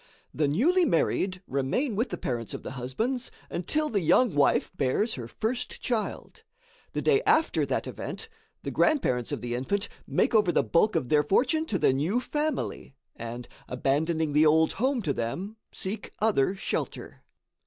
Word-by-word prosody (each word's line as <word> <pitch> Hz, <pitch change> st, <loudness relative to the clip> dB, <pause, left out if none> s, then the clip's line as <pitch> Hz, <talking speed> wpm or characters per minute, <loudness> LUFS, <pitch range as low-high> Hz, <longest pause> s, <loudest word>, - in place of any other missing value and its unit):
The 150 Hz, -1 st, +1 dB
newly 310 Hz, -, +3 dB
married 185 Hz, -, +1 dB
remain 140 Hz, -, -1 dB
with 230 Hz, +6 st, 0 dB
the -, -, -4 dB
parents 115 Hz, -3 st, -3 dB
of -, -, -8 dB
the -, -, -6 dB
husbands, 220 Hz, -, -2 dB, 0.2 s
until 305 Hz, -, 0 dB
the 210 Hz, -8 st, 0 dB
young 180 Hz, +6 st, +4 dB
wife 145 Hz, -1 st, +3 dB
bears 205 Hz, -, +1 dB
her 120 Hz, -3 st, -6 dB
first 240 Hz, -, -3 dB
child. 230 Hz, -4 st, -3 dB, 0.5 s
The -, -, -2 dB
day 420 Hz, -1 st, +4 dB
after 325 Hz, -8 st, +2 dB
that -, -, -1 dB
event, 450 Hz, -, -6 dB, 0.4 s
the -, -, -3 dB
grandparents 130 Hz, -, +2 dB
of -, -, -3 dB
the 120 Hz, 0 st, -3 dB
infant 195 Hz, -, -1 dB, 0.2 s
make -, -, +1 dB
over 210 Hz, -5 st, +4 dB
the -, -, +2 dB
bulk 210 Hz, +6 st, +2 dB
of 125 Hz, -, 0 dB
their 150 Hz, -1 st, +5 dB
fortune 255 Hz, -, +2 dB
to 195 Hz, -, 0 dB
the 135 Hz, -, +3 dB
new 160 Hz, -, +1 dB
family, 295 Hz, -, -3 dB, 0.2 s
and, 120 Hz, +1 st, -7 dB, 0.2 s
abandoning 150 Hz, +4 st, 0 dB
the 155 Hz, +2 st, +5 dB
old 160 Hz, +1 st, +4 dB
home 260 Hz, -2 st, +1 dB
to 145 Hz, -, 0 dB
them, 185 Hz, -, -4 dB
seek 200 Hz, +2 st, -5 dB
other 200 Hz, -5 st, +2 dB
shelter. 195 Hz, -, -4 dB
185 Hz, 165 wpm, -27 LUFS, -, 0.5 s, their